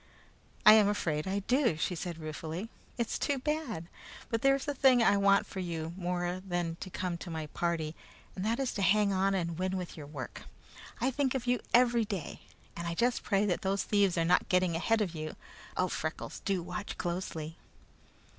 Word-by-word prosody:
"I 215 - +11
am 215 -2 +6
afraid 160 -6 -1
I 195 +1 0
do," 250 - +2
she 170 - -1
said 175 -1 -4
ruefully. 160 +5 -5 0.3
"It's 235 -2 -1
too 285 - 0
bad! 270 - -2 0.4
But 230 -1 0
there 275 0 +5
is 275 - -5
a 290 - 0
thing 260 -3 +5
I 205 - +5
want 200 0 +4
for 190 - -7
you 165 -2 -3
more 180 0 -2
than 175 -3 -2
to 185 - -7
come 180 -1 -3
to 175 - -7
my 160 -2 -3
party, 160 0 -2 0.4
and 185 - -4
that 225 +4 0
is 265 -2 -1
to 200 - -3
hang 200 +2 +4
on 195 +1 +2
and 170 -2 -2
win 185 0 0
with 180 -2 -5
your 150 -3 -8
work. 145 -3 -7 0.5
I 255 +4 +1
think 270 0 0
of 250 -2 -2
you 245 -1 +2
every 240 -1 +5
day, 195 -8 -5 0.3
and 170 0 -4
I 170 - -2
just 245 +5 +1
pray 200 0 +2
that 185 -4 0
those 195 0 0
thieves 200 -4 +2
are 165 - +2
not 180 +2 +3
getting 180 -3 +2
ahead 225 +6 +2
of 185 -5 -1
you. 155 -1 -5 0.4
Oh, 185 - +2
Freckles, 160 -2 -4
do 190 -3 0
watch 190 +4 -5
closely!" 170 -3 -4
185 Hz, 200 wpm, -31 LUFS, 170-220 Hz, 0.5 s, I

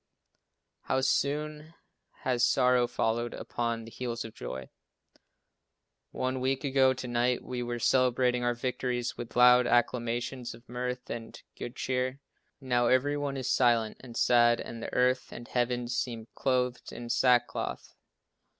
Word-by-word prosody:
How 130 - +1
soon 150 +4 -1 0.5
has 125 -2 0
sorrow 125 -1 +4
followed 120 +1 -1
upon 115 -1 -3
the 115 - -11
heels 120 -1 -4
of 110 - -9
joy! 65 +1 -7 1.4
One 130 0 -2
week 130 +2 0
ago 130 -1 +3
to 125 0 -6
night 120 +1 +1
we 125 -1 -4
were 120 0 -3
celebrating 125 0 +2
our 120 0 +1
victories 125 0 -2
with 120 - -8
loud 125 0 +7
acclamations 120 +1 0
of 120 - -19
mirth 125 +1 -4
and 115 -1 -7 0.2
good 120 - -7
cheer. 130 +1 -1 0.4
Now 125 -3 +1
every 130 +4 +3
one 145 -1 -2
is 130 - 0
silent 115 -3 +2
and 120 -2 -9
sad 120 -1 +4
and 115 - -7
the - - -5
earth 125 +1 +1
and 120 - -9
heavens 125 0 -1
seem 115 -3 -3
clothed 125 -2 -1
in 120 - -7
sack 120 0 +4
cloth. - - -5
125 Hz, 145 wpm, -29 LUFS, 120-130 Hz, 1.4 s, loud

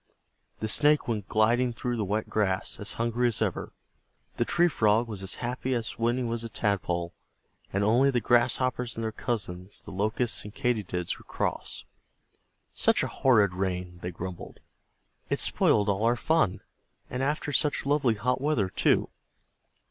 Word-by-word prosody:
The 110 - -1
Snake 150 +7 +3
went 105 -5 -2
gliding 120 +4 +2
through 120 +1 -2
the 110 - -1
wet 105 +3 -1
grass, 95 -3 -1
as 105 - -6
hungry 120 +1 0
as 115 - -1
ever, - - -2 0.7
the - - +1
Tree 175 0 +3
Frog 115 -6 +2
was 105 -4 -6
as 95 +1 -4
happy 125 +1 -2
as 115 -2 -4
when 120 +2 +1
he 130 - -1
was 115 -1 -2
a 115 - -5
Tadpole, 90 -6 -1 0.6
and 100 +1 0
only 120 +6 +4
the 125 -3 +2
Grasshoppers 125 0 +1
and 115 - -3
their 110 - -1
cousins, 100 -5 -4
the - - -8
Locusts 110 +5 -1
and 105 0 -10
Katydids, 100 -8 -1
were - - -17
cross. - - -3 0.9
"Such - - +3
a - - 0
horrid 105 -8 +4
rain!" 90 -1 -3
they 90 - -3
grumbled, 90 +1 -7 0.7
"it - - +1
spoiled 105 -1 +3
all 100 +1 +1
our 120 +1 +4
fun. 155 - +1 0.5
And 125 - -4
after 145 +2 -1
such 145 0 +1
lovely 140 -5 +2
hot 125 +5 0
weather 135 -10 +1
too." - - +2
115 Hz, 165 wpm, -28 LUFS, 100-125 Hz, 0.9 s, only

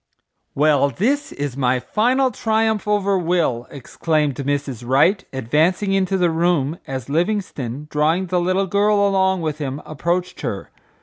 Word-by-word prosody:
"Well, 145 -1 +3
this 280 - -1
is 145 -3 -4
my 130 -2 +1
final 255 - +1
triumph 220 -1 0
over 200 -2 +1
Will," 165 -9 0
exclaimed 150 +2 -1
Mrs. 140 -3 -3
Wright, 145 - +3
advancing 155 - +1
into 195 0 +1
the 175 -2 +2
room, 165 -2 0
as 130 -3 -5
Livingstone, 150 - -2
drawing 160 +5 +1
the 180 0 0
little 185 +2 +1
girl 200 +1 +2
along 190 -2 +1
with 155 -1 -3
him, 140 -1 -4
approached 175 +4 -2
her. 100 - -5
170 Hz, 140 wpm, -20 LUFS, 140-195 Hz, -, Well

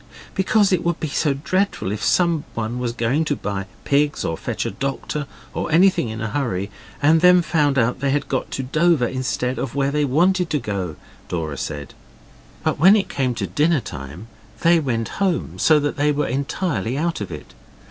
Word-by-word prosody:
'Because 200 +1 +3
it 175 - +1
would 170 -1 0
be 160 - -2
so 140 0 +1
dreadful 185 - -1
if 105 0 -4
someone 145 -9 0
was 125 -1 -1
going 120 +6 0
to 145 - 0
buy 100 -5 -4 0.2
pigs 145 +1 +1
or 80 - -1
fetch - - -3
a - - -2
doctor 140 +2 -3 0.3
or - - -3
anything 175 -7 +4
in 110 0 -5
a 110 - -2
hurry 105 -7 -2 0.3
and 160 +2 +5
then 180 0 +6
found 150 -5 +2
they 125 +3 +1
had 145 +1 0
got 130 - -2
to 135 - -3
Dover 155 +1 +2
instead 130 0 -2
of 130 -1 -4
where 140 0 +1
they 150 0 +1
wanted 175 +6 +2
to 150 - +1
go 100 - -3
to,' - - -19 0.3
Dora 80 -4 -3
said. 70 -1 -5 0.7
But - - 0
when 190 +7 +7
it 205 - 0
came 130 -3 -1
to - - -2
dinner 155 +1 +2
time 70 +7 -8 0.4
they 170 0 +5
went 120 -6 -1
home, 185 -4 0
so 155 -1 +5
that 145 0 -2
they 145 +1 +2
were 145 0 0
entirely 135 -1 -2
out 165 -4 -1
of 100 - -5
it. 75 - -9
140 Hz, 195 wpm, -21 LUFS, 115-165 Hz, 0.7 s, when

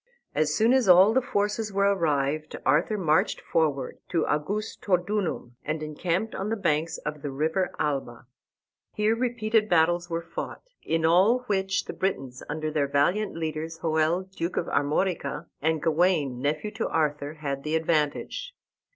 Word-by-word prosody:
As 150 0 +1
soon 220 +10 +3
as 260 -7 +3
all 185 +4 +8
the 260 - +3
forces 210 -1 -1
were 200 0 +1
arrived 155 -3 0
Arthur 175 +8 +2
marched 160 -5 +2
forward 145 -5 -1
to 165 -3 +1
Augustodunum, 185 - -1
and 155 0 -3
encamped 170 +7 -2
on 195 +2 -3
the 225 - 0
banks 165 -4 0
of 150 -1 -6
the 145 - -4
river 160 +7 0
Alba. 135 -5 -2 0.7
Here 215 +1 +2
repeated 230 -3 +1
battles 175 +1 +3
were 165 0 -2
fought, 165 - -6 0.2
in 165 0 0
all 190 +9 +4
which 200 -4 -1
the - - -6
Britons, 135 -10 -3
under 155 +1 -2
their 150 -2 +1
valiant 165 +8 +1
leaders, 160 0 -4
Hoel, 160 +2 +2
Duke 185 -2 -5
of - - +1
Armorica, 150 +1 -1 0.2
and 160 +1 0
Gawain, 160 -6 +2
nephew 155 +9 -1
to 220 +2 -2
Arthur, 150 -1 -1
had 140 -3 -4
the 155 +2 -2
advantage. 160 - -1
165 Hz, 150 wpm, -26 LUFS, 150-195 Hz, 0.7 s, all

